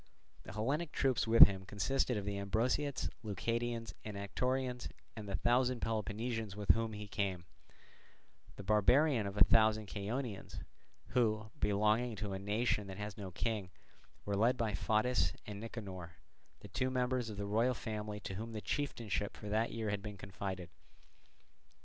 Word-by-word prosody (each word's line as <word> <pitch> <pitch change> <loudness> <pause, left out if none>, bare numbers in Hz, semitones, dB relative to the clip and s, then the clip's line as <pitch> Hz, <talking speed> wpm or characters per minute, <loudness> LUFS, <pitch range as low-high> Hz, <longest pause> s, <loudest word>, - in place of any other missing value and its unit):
The 95 - -10
Hellenic 140 +10 -1
troops 130 -4 +1
with 115 +1 +11
him 95 -1 -3
consisted 125 +5 0
of 100 - -3
the 100 0 -2
Ambraciots, 125 +8 0
Leucadians, 115 +2 -2
and 105 -2 -6
Anactorians, 125 +5 -1 0.3
and 105 -2 -7
the 100 - -1
thousand 125 +5 +2
Peloponnesians 110 -1 -2
with 105 -1 +4
whom 115 -1 0
he 105 0 -6
came; 95 -4 -2 1.1
the 100 - -8
barbarian 110 +4 +4
of 100 +1 -6
a - - +9
thousand 110 -1 +4
Chaonians, 105 +2 -4 0.5
who, 110 -3 +1
belonging 110 +3 +2
to 105 -1 -4
a 95 - -3
nation 105 +1 0
that 95 0 -7
has 105 -1 -5
no 100 -3 -6
king, 100 0 -2 0.6
were 100 - 0
led 120 +5 +3
by 115 -2 0
Photys 110 +5 +2
and 105 -1 -6
Nicanor, 95 -7 -7 0.5
the - - -9
two 130 +7 -1
members 125 -2 0
of 105 - -6
the 100 - -2
royal 115 +5 +2
family 105 -2 -4
to 95 - -5
whom 115 +4 -5
the 110 - -3
chieftainship 115 -8 -2
for 105 - -7
that 110 +2 +1
year 110 -2 -2
had 100 -1 -2
been 105 0 -7
confided. 95 -2 -5
110 Hz, 160 wpm, -35 LUFS, 100-120 Hz, 1.1 s, with